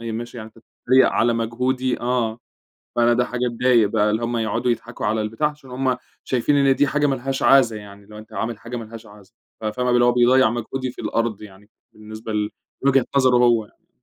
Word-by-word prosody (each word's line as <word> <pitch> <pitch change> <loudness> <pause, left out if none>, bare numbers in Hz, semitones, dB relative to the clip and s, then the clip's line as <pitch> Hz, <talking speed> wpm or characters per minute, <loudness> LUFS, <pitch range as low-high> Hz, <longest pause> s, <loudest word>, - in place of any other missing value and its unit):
ماشي 115 +1 -6
يعني 110 -2 -7
أنتَ - - -15
بتتريق 130 +3 +2
على 120 0 +2
مجهودي 125 +3 -1
آه، 120 -2 -1 0.6
فأنا 120 0 +4
ده 125 +1 +2
حاجة 125 0 -2
تضايق 120 -2 +3
بقى، 105 0 +1
اللي 110 +2 -1
هم 120 0 -2
يقعدوا 115 +2 -1
يضحكوا 115 -1 -4
على 110 +1 0
البتاع، 115 +8 -1
عشان 150 -3 -14
هم 130 0 -1 0.3
شايفين 130 +3 +1
إن 135 -1 +4
دي 145 - +3
حاجة 145 +1 +1
ما 135 - +1
لهاش 135 +1 -4
عازة 125 -3 +5
يعني، 100 -1 -12
اللي 105 +1 -16
هو 105 - -9
أنتَ 110 +1 -14
عامل 110 +2 -3
حاجة 120 +2 -7
ما 115 - -5
لهاش 115 +1 -11
عازة. 105 0 -17 0.3
ف - - -10
فاهمة 125 +4 -1
اللي 120 0 +4
هو 120 - +4
بيضيع 125 0 +4
مجهودي 125 +2 -4
في 125 - -11
الأرض 115 -3 -2
يعني، 105 0 -14 0.2
بالنسبة 110 +1 -8
ل 105 0 -1 0.3
لوجهة 135 -2 +4
نظره 130 -2 +4
هو 120 -2 +3
يعني. - - -27
120 Hz, 220 wpm, -21 LUFS, 110-125 Hz, 0.6 s, عازة